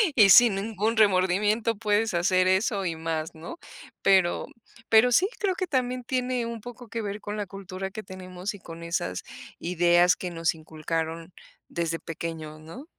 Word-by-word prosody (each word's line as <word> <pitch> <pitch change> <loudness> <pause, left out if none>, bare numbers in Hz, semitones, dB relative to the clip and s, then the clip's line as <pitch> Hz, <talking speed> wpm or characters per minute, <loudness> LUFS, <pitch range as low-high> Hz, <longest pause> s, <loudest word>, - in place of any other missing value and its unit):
Y 205 -5 +7
sin 235 -2 +8
ningún 220 +2 -1
remordimiento 205 +3 +3
puedes 215 -1 +1
hacer 185 +1 +3
eso 195 +1 +1
y 165 -2 -1
más, 160 -1 -3
¿no? 170 - -9 0.4
Pero 190 -3 +3 0.4
pero 225 +3 +6
sí 370 - +4
creo 390 -3 +1
que 370 -1 -2
también, 255 -3 -1
tiene 250 -1 -1
un 230 -2 -6
poco 245 0 -10
que 230 +1 -4
ver 205 +1 -5
con 205 +1 -5
la 205 - -2
cultura 195 0 -7
que 215 - -6
tenemos 185 +2 -7
y, - - -12
con 165 -1 -10
esas 90 - -3 0.4
ideas 175 +1 +3
que 180 -1 -5
nos 165 0 0
inculcaron 160 +1 -4 0.4
desde 165 -1 -2
pequeños, 160 -1 -6
¿no? 165 - -11
190 Hz, 165 wpm, -26 LUFS, 170-225 Hz, 0.4 s, sin